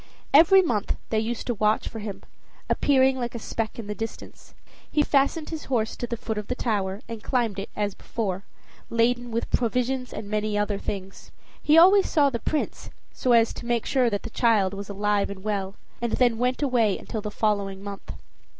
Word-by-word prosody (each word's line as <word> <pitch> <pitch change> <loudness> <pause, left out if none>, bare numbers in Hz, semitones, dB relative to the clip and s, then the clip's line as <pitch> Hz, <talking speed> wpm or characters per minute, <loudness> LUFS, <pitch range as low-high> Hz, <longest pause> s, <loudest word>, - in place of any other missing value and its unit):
Every 345 +6 +7
month 220 - -1 0.2
they 220 - +2
used 225 +1 -3
to 240 - 0
watch 215 0 +1
for 225 - -6
him, 205 -2 -6 0.5
appearing 265 -2 +3
like 240 -1 -3
a - - -2
speck 225 0 -4
in 230 - -6
the 210 - -4
distance. 225 +2 -8 0.4
He 300 - +3
fastened 285 +3 +1
his 315 -2 -5
horse 225 -4 -1
to 240 - -4
the 235 0 -3
foot 220 -1 -3
of 210 - -7
the 250 - -2
tower, 205 -4 -1
and 230 -2 -7
climbed 230 -6 0
it, 195 - -5
as 205 -1 -1
before, 195 -4 -4 0.5
laden 240 +1 +1
with 230 0 -3
provisions 250 +2 0
and 210 - -6
many 210 0 -1
other 205 -1 0
things. 195 -2 -6 0.3
He 305 +2 +4
always 380 +4 +7
saw 285 -3 +3
the 235 - -2
Prince, 300 +6 -3 0.2
so 250 - +1
as 230 -1 +4
to 235 - -8
make 240 -2 0
sure 255 -3 +2
that 205 -2 -3
the 230 - -7
child 215 -6 +2
was 200 0 -6
alive 205 0 0
and 195 -1 -8
well, 200 -2 -2 0.3
and 235 -1 -1
then 240 -3 +2
went 250 +3 0
away 235 -7 +2
until 220 - -5
the 210 - -4
following 200 -2 -1
month. 200 -1 -7
225 Hz, 200 wpm, -25 LUFS, 205-250 Hz, 0.5 s, Every